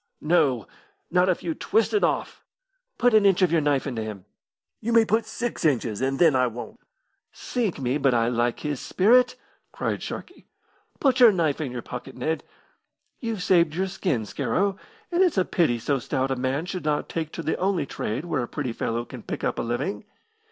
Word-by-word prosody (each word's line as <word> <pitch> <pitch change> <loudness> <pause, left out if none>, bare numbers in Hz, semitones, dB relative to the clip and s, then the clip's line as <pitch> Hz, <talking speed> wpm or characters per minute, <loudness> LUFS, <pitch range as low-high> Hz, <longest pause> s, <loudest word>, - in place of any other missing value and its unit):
"No; 150 -8 +2 0.4
not 180 +1 +3
if 185 - 0
you 170 -2 -1
twist 220 +7 +1
it 415 - +2
off." - - -1 0.5
"Put 245 -1 +3
an 215 -1 +6
inch 195 -1 +4
of 180 - +3
your 165 -2 +3
knife 145 -2 +1
into 125 -6 -3
him." 105 -4 -6 0.5
"You 235 +2 -2
may 230 -1 +6
put 220 +1 +1
six 240 -4 -4
inches, 125 -8 +1
and 135 +1 0
then 160 -4 +5
I 130 -1 +3
won't." 125 - -8 0.5
"Sink 230 -8 -2
me, 130 +1 -1
but 135 -1 +3
I 115 -1 +2
like 120 0 0
his 145 -3 -2
spirit!" 250 +6 +4 0.4
cried - - -2
Sharkey. - - -8 0.5
"Put 270 -2 +2
your 240 -3 +9
knife 160 -5 0
in 140 -5 -3
your 125 -1 -5
pocket, 125 +1 -8
Ned. 160 +6 -2 0.8
You've 225 -6 -3
saved 170 -4 +3
your 190 +2 0
skin, 180 - -1
Scarrow, 140 - 0 0.4
and 350 +1 +2
it's 360 - +3
a 185 - +3
pity 155 -9 +1
so 135 +4 0
stout 130 +2 -1
a - - +1
man 130 +5 -1
should 180 0 -5
not 150 -1 0
take 160 -2 -4
to 165 - -5
the 160 - -1
only 190 -4 0
trade 125 +3 -4
where 155 -6 -1
a 120 - -3
pretty 130 -4 -3
fellow 115 +1 -2
can - - -9
pick - - -6
up - - -1
a - - +1
living. 120 - -3
155 Hz, 200 wpm, -25 LUFS, 125-190 Hz, 0.8 s, your